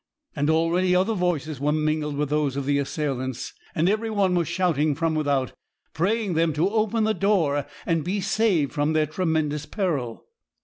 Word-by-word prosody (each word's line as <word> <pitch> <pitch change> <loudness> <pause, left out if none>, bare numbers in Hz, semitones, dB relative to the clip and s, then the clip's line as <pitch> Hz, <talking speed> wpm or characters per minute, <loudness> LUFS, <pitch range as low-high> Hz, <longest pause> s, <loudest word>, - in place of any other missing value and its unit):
And 145 0 0
already 170 +3 +2
other 190 +5 +2
voices 165 - -1
were 145 +2 +1
mingled 155 -1 -1
with 150 -1 -1
those 150 -3 +1
of 140 -1 -3
the 140 0 +2
assailants; 130 -3 -3 0.2
and 160 +3 +2
every 215 +3 0
one 200 -4 +1
was 170 -3 +1
shouting 160 -4 +1
from 165 +1 0
without, 145 -4 0 0.4
praying 200 +4 0
them 165 -1 +2
to 170 +7 +1
open 220 0 +1
the 220 0 +2
door, 165 -10 +1 0.2
and 165 -2 +1
be 190 +5 -1
saved 195 -7 +1
from 150 +1 0
their 155 -1 +3
tremendous 155 -2 -1
peril. 150 - -2
160 Hz, 175 wpm, -24 LUFS, 145-185 Hz, 0.4 s, their